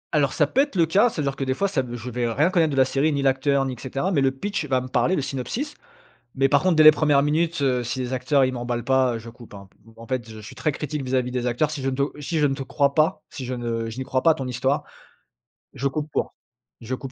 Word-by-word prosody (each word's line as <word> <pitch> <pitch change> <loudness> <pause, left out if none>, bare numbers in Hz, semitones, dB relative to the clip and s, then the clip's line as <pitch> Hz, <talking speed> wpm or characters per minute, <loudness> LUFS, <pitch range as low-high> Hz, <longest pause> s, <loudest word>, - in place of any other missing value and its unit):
Alors, 140 -3 +2
ça 150 - +3
peut 250 - +2
être 285 -6 -2
le 170 -3 +4
cas, 200 +9 +3
ça 160 - -4
veut - - -2
dire 140 0 -1
que 135 - -3
des 130 0 -1
fois 200 - +1
ça 185 -9 0
v 120 -1 -6
je 120 +2 -7
vais 120 -1 -1
rien 150 +10 +2
connaître 165 -4 +3
de - - -2
la 130 - +5
série, 145 +3 +1
ni 140 -1 -1
l'acteur 135 +1 +2
ni, 130 - -3
et - - -7
cetera, 135 +8 -2
mais 145 -7 +2
le 135 - +4
pitch 180 +4 -3
va 130 -1 +2
me 130 - -6
parler, 180 +7 +1
le 140 - -1
synopsis, 180 - -4 0.6
mais 135 0 +3
par 145 +3 +3
contre 185 -3 +2
dès 155 - +6
les 155 - +11
1res 150 -2 +3
minutes, 160 +2 0
heu, 125 -2 +1
si 120 +2 -4
les 125 0 -3
acteurs, 130 +2 +2
ils 130 - 0
m'emballent 120 -1 -3
pas, 130 -2 +2
heu, - - -4
je 115 +1 -11
coupe, 120 -2 -13
hein. 100 -1 -11
P 115 - -22
en 115 0 -12
fait, 130 -4 -3
je 110 - -10
suis 110 0 -10
très 150 - 0
critique 150 0 -4
vis-à-vis 125 -1 -1
des 125 -1 -2
acteurs, 140 +5 0
si 145 -3 -5
je 135 - 0
ne 130 - -4
te 140 +1 -2
si 160 +3 -2
je 150 - +4
ne 135 - 0
te 135 - -5
crois 140 +1 0
pas, 155 0 +1
si 130 - -8
je 125 +1 -3
ne 115 -2 -3
je 120 - -9
n'y 130 - -3
crois 130 0 -1
pas 165 - +5
à 160 - +5
ton 135 -4 -5
histoire, 135 +4 -1 0.9
je 140 - -1
coupe 150 +2 -4
court, - - -1 0.5
je 125 +2 -4
coupe 135 0 -8
135 Hz, 305 wpm, -23 LUFS, 125-150 Hz, 0.9 s, les